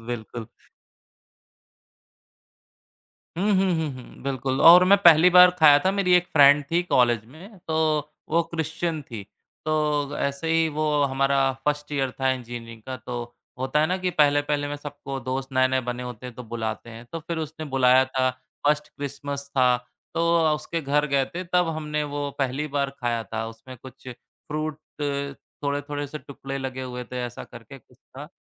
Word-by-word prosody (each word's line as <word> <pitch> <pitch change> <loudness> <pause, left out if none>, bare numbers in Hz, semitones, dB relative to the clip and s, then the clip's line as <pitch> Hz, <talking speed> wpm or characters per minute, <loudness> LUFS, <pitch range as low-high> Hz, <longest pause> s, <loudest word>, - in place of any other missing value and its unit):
बिल्कुल। 115 -1 -6 2.9
हुँ, 200 +4 +1
हुँ, 190 -1 +2
हुँ, 160 -1 -1
हुँ, 130 -1 -13
बिल्कुल, 135 -1 -2
और 180 +2 +9
मैं 200 +2 +6
पहली 170 +1 +8
बार 180 0 +8
खाया 150 -3 +8
था। 190 - +4
मेरी 195 -2 +1
एक 180 0 +4
फ्रेंड 145 -1 +7
थी, 175 +1 +2
कॉलेज 120 -9 +2
में, 180 - -14
तो 160 - 0 0.5
वो 170 +1 +2
क्रिश्चियन 165 0 -3
थी। 115 -6 -8 0.4
तो 150 -2 0
ऐसे 140 +3 -2
ही 165 0 +3
वो 155 +1 -2 0.2
हमारा 135 0 +1 0.3
1st 150 0 -1
ईयर 135 -2 0
था, 135 +1 0
इंजीनियरिंग 115 -3 -6
का, 130 +2 -6
तो 120 -1 -7 0.2
होता 130 +3 0
है 155 - +3
ना 185 +3 0
कि 185 0 -1
पहले-पहले 145 -1 +2
में 145 - -4
सबको 145 -2 -7
दोस्त 130 +2 -4
नए-नए 130 0 +2
बने 125 0 -3
होते 125 0 -7
हैं, 125 - -9
तो 125 - -8
बुलाते 115 0 -5
हैं। 115 +1 -10
तो 165 - -4
फिर 165 +1 -5
उसने 155 0 -5
बुलाया 130 0 +5
था, 130 0 0 0.4
1st 150 0 +2
क्रिस्मस 140 0 -6
था। 125 -1 +4 0.4
तो 165 - 0 0.2
अ, 160 -2 +3
उसके 155 +2 -4
घर 150 0 +1
गए 140 -1 +2
थे, 180 - -4
तब 180 -1 +1
हमने 150 -1 -2
वो 145 0 -4
पहली 135 +2 -1
बार 140 -1 0
खाया 120 -2 -1
था। 110 0 -2
उसमें 115 +3 -12
कुछ 130 0 -12
फ्रूट 155 +4 -6 0.9
थोड़े-थोड़े 145 0 -2
से 150 +2 -7
टुकड़े 135 0 -7
लगे 130 -1 -5
हुए 125 -1 -6
थे। 125 - -3
ऐसा 120 - -9
करके 120 +2 -12
कुछ 125 0 -26
था। 140 +3 -12
140 Hz, 175 wpm, -24 LUFS, 130-155 Hz, 2.9 s, और